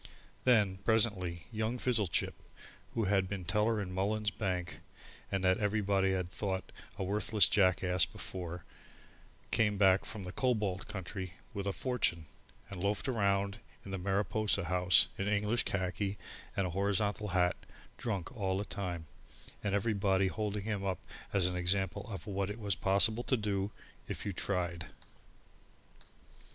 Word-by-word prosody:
Then 105 -7 +4
presently 95 -7 +2
young 110 +2 -1
Fizzlechip, 115 -8 +1 0.6
who 115 - +1
had 95 -2 +2
been 100 -2 -4
teller 105 +4 +2
in 95 -2 -4
Mullins's 105 +3 0
Bank 90 -5 -2 0.5
and 95 -1 0
that 95 +1 +3
everybody 100 -2 +2
had 90 -1 -2
thought 95 -1 -3 0.3
a 100 - -2
worthless 105 +2 +3
jackass 95 -2 +3
before, 90 -2 -6 0.9
came 105 -3 +3
back 95 -1 +5
from 105 -3 -7
the 90 - -5
Cobalt 105 -6 0
country 95 -1 -5 0.2
with 100 -1 -3
a - - +2
fortune, 95 -9 0 0.5
and 95 -3 -5
loafed 100 +6 0
round 100 -4 +1 0.3
in 100 - -7
the 95 - -2
Mariposa 100 +2 +1
House 90 +1 +5
in 100 - 0
English 105 +3 +1
khaki 95 +1 -1 0.4
and 100 - +2
a 90 - -2
horizontal 100 +3 0
hat, 90 -2 +2 0.4
drunk 100 -3 -3
all 95 -4 0
the 100 - -2
time, 90 -5 -4 0.6
and 100 -1 +1
everybody 100 -2 +2
holding 105 0 -2
him 105 -2 -2
up 95 -2 0 0.3
as 95 -3 +2
an 90 0 0
example 95 +3 0
of 95 - -6
what 100 -1 -2
it 105 - -4
was 100 -2 +1
possible 100 +5 +4
to 130 - +2
do 100 -2 -1 0.4
if - - -4
you 100 - -2
tried. 90 -2 -2
100 Hz, 145 wpm, -33 LUFS, 95-105 Hz, 0.9 s, back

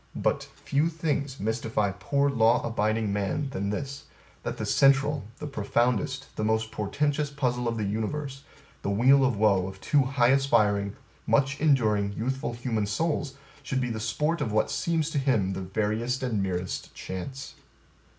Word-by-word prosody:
But, - - -5 0.3
But, - - -25
Few 145 +4 +2
things 150 -4 -2
mystify 110 -1 0
poor 140 +8 0
law 115 -2 +3
abiding 110 -1 0
man 135 +8 -1
than 100 -5 -2
this, 140 +7 -4 0.4
that - - -4
the - - -3
central, 140 -1 +3
the - - -6
profoundest, 125 +1 -1
the - - -1
most 110 +1 0
portentous 145 +7 -1
puzzle 125 -4 -1
of 115 0 -1
the 110 - -1
universe 130 +7 -3 0.4
the - - -2
weal 130 +7 +5
of 130 -5 +2
woe 100 -3 +3
of 95 0 -9
two 145 +5 +3
high 130 -2 +3
aspiring, 105 -7 +2 0.3
much 140 +1 +2
enduring, 110 -9 +3
youthful 130 +3 -2
human 115 -3 -1
souls, 145 +4 -1 0.3
should 135 -1 -2
be 125 -2 -1
the 110 - -3
sport 150 +10 -1
of 110 - -1
what 110 +1 +1
seems 165 -2 0
to 145 - 0
him 110 -9 +1
the 95 - -4
veriest 110 +6 -1
and 115 -6 0
merest 90 -1 -3
chance. 130 +9 -6
120 Hz, 165 wpm, -27 LUFS, 105-140 Hz, 0.4 s, weal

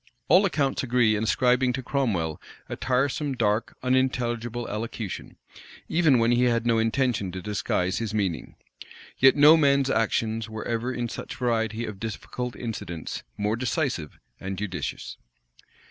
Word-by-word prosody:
All 185 +6 +6
accounts 140 -6 0
agree 120 -4 +3
in 105 +1 -1
ascribing 125 +4 +2
to 130 0 -4
Cromwell 100 - -1 0.3
a - - -4
tiresome, 135 +2 0
dark, 110 -2 0
unintelligible 120 -2 0
elocution, 110 -1 -5 0.5
even 160 -5 +4
when 115 0 +3
he 120 +1 +3
had 115 -1 +1
no 115 -1 +3
intention 115 -4 0
to 95 - -4
disguise 90 -1 -1
his 115 -3 -3
meaning: 100 -6 -2 0.6
yet 135 0 +7
no 150 +2 +8
man's 140 -3 +3
actions 110 0 0
were 110 0 -6
ever, 120 +2 -1
in 120 -1 -2
such - - -7
a - - -14
variety 115 -2 -1
of 105 -3 -7
difficult 120 +3 -5
incidents, 95 -8 -5 0.2
more 105 +1 0
decisive 125 - -2 0.2
and 95 0 -5
judicious. 95 -2 -5
115 Hz, 145 wpm, -26 LUFS, 105-130 Hz, 0.6 s, no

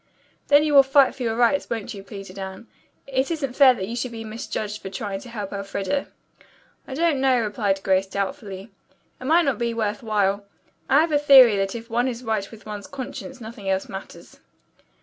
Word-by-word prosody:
"Then 290 +1 +6
you 305 -1 0
will 280 - +10
fight 270 0 +4
for 270 - -12
your 225 -2 0
rights, 245 +4 +2
won't 230 +1 -4
you?" 200 - -8
pleaded 195 -2 -9
Anne. 190 +3 -7 0.4
"It 265 0 -1
isn't 295 -6 -2
fair 265 -3 +7
that 190 - -4
you 230 - -5
should 245 0 -3
be 225 -1 -7
misjudged 215 -2 -5
for 190 - -6
trying 195 0 -4
to 240 - -12
help 210 -4 -6
Elfreda." 200 +6 -3 0.8
"I 265 - -6
don't 320 -3 +1
know," 260 -2 +3
replied 205 -3 -1
Grace 190 0 +2
doubtfully. 200 +1 -5 0.5
"It 255 - -9
might 330 +4 +4
not 270 -6 0
be 235 -1 -1
worth 210 -2 -2
while. 205 -3 0 0.5
I 280 +3 +6
have 325 0 0
a 295 - +3
theory 265 -6 +8
that 195 +2 -1
if 230 0 -7
one 240 +2 +1
is 245 -1 -4
right 220 -4 -2
with 225 -1 -14
one's 210 +1 -7
conscience 270 -1 -7
nothing 220 -3 -7
else 190 0 0
matters." 195 0 -10
230 Hz, 205 wpm, -23 LUFS, 200-265 Hz, 0.8 s, will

